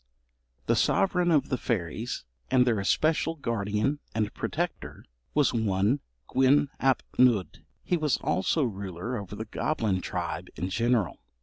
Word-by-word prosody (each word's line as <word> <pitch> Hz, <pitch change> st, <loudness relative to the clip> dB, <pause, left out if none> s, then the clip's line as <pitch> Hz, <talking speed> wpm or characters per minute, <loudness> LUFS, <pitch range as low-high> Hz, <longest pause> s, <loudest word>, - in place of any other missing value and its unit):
The -, -, +2 dB
sovereign 180 Hz, -2 st, +2 dB
of 155 Hz, -4 st, +3 dB
the 130 Hz, -, -1 dB
fairies, 110 Hz, -, -2 dB, 0.2 s
and 125 Hz, -1 st, +4 dB
their 115 Hz, -4 st, +2 dB
especial 155 Hz, +10 st, +1 dB
guardian 115 Hz, 0 st, -1 dB, 0.2 s
and 105 Hz, -1 st, 0 dB
protector, -, -, -4 dB, 0.3 s
was 150 Hz, -2 st, +3 dB
one 110 Hz, +3 st, +1 dB, 0.3 s
Gwyn 135 Hz, +2 st, +4 dB
ap 135 Hz, -1 st, +2 dB, 0.2 s
Nudd. 120 Hz, -7 st, +3 dB, 0.2 s
He 175 Hz, -, +1 dB
was 150 Hz, -5 st, +1 dB
also 145 Hz, -, +1 dB
ruler 100 Hz, 0 st, -4 dB
over 100 Hz, -3 st, -6 dB
the 110 Hz, +2 st, -5 dB
goblin 110 Hz, -5 st, -1 dB
tribe -, -, -4 dB
in 90 Hz, +5 st, -3 dB
general. 115 Hz, -3 st, +1 dB
115 Hz, 135 wpm, -28 LUFS, 100-140 Hz, 0.3 s, and